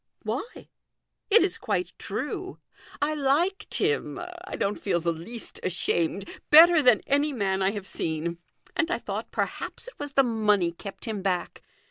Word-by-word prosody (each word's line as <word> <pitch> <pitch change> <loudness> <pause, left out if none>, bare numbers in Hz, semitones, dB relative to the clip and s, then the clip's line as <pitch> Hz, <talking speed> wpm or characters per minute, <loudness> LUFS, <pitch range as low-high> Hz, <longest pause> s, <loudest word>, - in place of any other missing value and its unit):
" - - -40
Why? - - -5 0.6
it 445 0 +6
is 370 - -1
quite 180 -4 -1
true. 295 - -4 0.5
I 305 +1 +1
liked 310 +8 0
him 440 +3 0 0.3
I - - -4
don't 200 +1 -1
feel 185 -4 +1
the 170 0 0
least 220 +9 -6
ashamed 180 +1 0 0.2
better 325 +1 +9
than 245 -6 +5
any 285 +2 +2
man 195 -6 0
I 190 - +3
have 205 -3 -5
seen; 165 -1 -3 0.4
and 325 - +1
I 355 - +1
thought, - - -5
perhaps, - - -4
it - - -12
was 290 -1 -5
the 275 - +5
money 210 -7 +2
kept 195 +4 -9
him 215 -4 -3
back. 185 -2 -2
225 Hz, 165 wpm, -27 LUFS, 190-305 Hz, 0.6 s, better